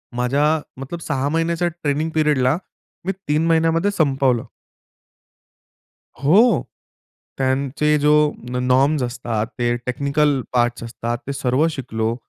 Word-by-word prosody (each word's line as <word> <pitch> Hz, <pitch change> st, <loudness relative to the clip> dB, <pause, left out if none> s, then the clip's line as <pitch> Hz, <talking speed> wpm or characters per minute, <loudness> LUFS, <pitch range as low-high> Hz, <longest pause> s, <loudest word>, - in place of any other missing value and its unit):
माझ्या 130 Hz, +4 st, +1 dB, 0.4 s
मतलब 165 Hz, +6 st, -6 dB
6 140 Hz, -1 st, 0 dB
महिन्याच्या 165 Hz, +2 st, 0 dB
ट्रेनिंग 155 Hz, -2 st, -2 dB
पीरियडला, 150 Hz, -2 st, +2 dB, 0.5 s
मी 190 Hz, -, +1 dB, 0.2 s
3 150 Hz, +2 st, +1 dB
महिन्यामध्ये 165 Hz, +3 st, +2 dB
संपवलं. 135 Hz, -, +1 dB, 1.8 s
हो. 210 Hz, -, +5 dB, 0.8 s
त्यांचे 135 Hz, +3 st, +1 dB
जो 150 Hz, +1 st, +3 dB, 0.4 s
नॉ 125 Hz, 0 st, -2 dB
नॉर्म्स 130 Hz, +3 st, +2 dB
असतात, 120 Hz, -3 st, -3 dB
ते 120 Hz, 0 st, +1 dB
टेक्निकल 140 Hz, +2 st, +1 dB
पार्ट्स 120 Hz, -1 st, +1 dB
असतात, 115 Hz, +1 st, -4 dB
ते 140 Hz, -, -2 dB
सर्व 135 Hz, +3 st, +1 dB
शिकलो. 115 Hz, -4 st, -2 dB
140 Hz, 110 wpm, -21 LUFS, 125-155 Hz, 1.8 s, हो